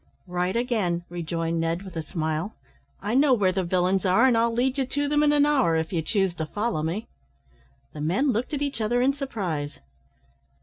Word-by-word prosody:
"Right 180 +1 -1
again," 215 -8 0
rejoined 165 -1 -2
Ned, 165 +3 -1
with 190 -3 -10
a 165 - -1
smile. 160 +4 -3 0.5
"I 210 +2 -1
know 270 0 +5
where 195 -5 +2
the 190 0 -1
villains 185 +2 +1
are, 190 +6 +4
and 255 -3 +4
I'll 230 +1 +3
lead 255 +4 0
you 265 - +1
to 285 +2 -1
them 295 +1 +2
in 300 -1 +4
an 290 -1 +4
hour, 265 - +3
if 160 +3 -1
you 165 - +1
choose 195 +2 0
to 160 - -3
follow 210 -3 -1
me." 170 +8 -2 0.9
The 150 - -7
men 195 - +2
looked 240 +2 -2
at 290 -1 -1
each 280 -5 -3
other 240 +3 +1
in 275 +2 +3
surprise. 185 - -4
195 Hz, 205 wpm, -25 LUFS, 170-255 Hz, 0.9 s, know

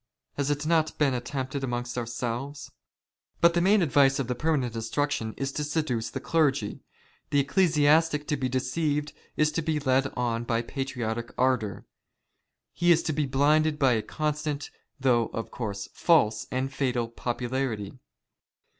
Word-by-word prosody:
Has 140 0 -1
it 145 +1 -1
not 160 -1 +1
been 140 -3 +2
attempted 130 +2 -3
amongst 120 -1 -3
ourselves? 125 +3 -4 0.7
But 170 0 +5
the 175 - +2
main 195 +2 +4
advice 140 -3 +4
of 135 - -2
the 125 - 0
permanent 135 -3 0
instruction 115 0 -2
is 135 0 -2
to 150 - -3
seduce 145 -7 -1
the - - -5
clergy. 140 -10 +1 0.5
The 145 - +3
ecclesiastic 150 -1 +3
to 150 - +2
be 130 -2 -2
deceived 145 +4 -1 0.2
is 150 0 +3
to 165 - -1
be 155 -1 0
led 135 -1 +2
on 120 -1 0
by 115 0 0
patriotic 120 -3 -3
ardour. 125 -5 0 0.9
He 175 0 +3
is 165 0 +4
to 155 - -1
be 145 -1 0
blinded 150 +3 +3
by 135 -3 +4
a 110 - +1
constant, 150 +3 -3 0.3
though, 120 -4 +3
of 115 - -4
course, 100 -4 -4
false, 130 -11 +3
and 130 +1 -2
fatal 125 -4 0
popularity. 120 -2 -3
135 Hz, 155 wpm, -27 LUFS, 120-150 Hz, 0.9 s, But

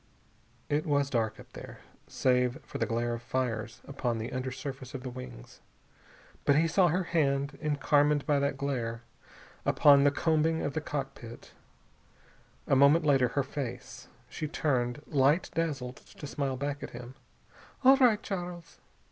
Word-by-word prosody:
It 150 +2 -1
was 140 -1 +1
dark, 110 -3 -1
up - - -15
there, - - -10 0.3
save 125 -1 +1
for - - -7
the - - 0
glare 120 0 -1
of 115 - -5
fires 115 -3 -3
upon 125 -4 -2
the 115 +4 -5
under 130 0 -3
surface 135 0 -7
of 130 - -6
the 130 - -5
wings. 125 - -10 0.8
But 140 - +4
he 160 +3 +3
saw 180 +2 +4
her 180 +3 +1
hand, 140 -4 0
encarmined 145 -1 +2
by 145 -3 +2
that 140 0 -1
glare, 120 -5 -3 0.6
upon 140 -1 +5
the 145 - +6
combing 160 +2 +1
of 145 - -2
the 160 - -2
cockpit. 135 -6 -6 1.1
A - - +2
moment 140 +4 +5
later 135 -4 +4
her 140 +3 -1
face. 135 -2 -6 0.2
She 155 - -5
turned, 135 -4 -1
light 145 +4 +2
dazzled, 140 -6 -2
to - - -12
smile 140 -2 -2
back 145 +2 -3
at - - -6
him. 120 +1 -9 0.7
"All 265 +1 +8
right, 240 -5 +4
Charles." 175 -4 -6
140 Hz, 155 wpm, -29 LUFS, 125-150 Hz, 1.1 s, All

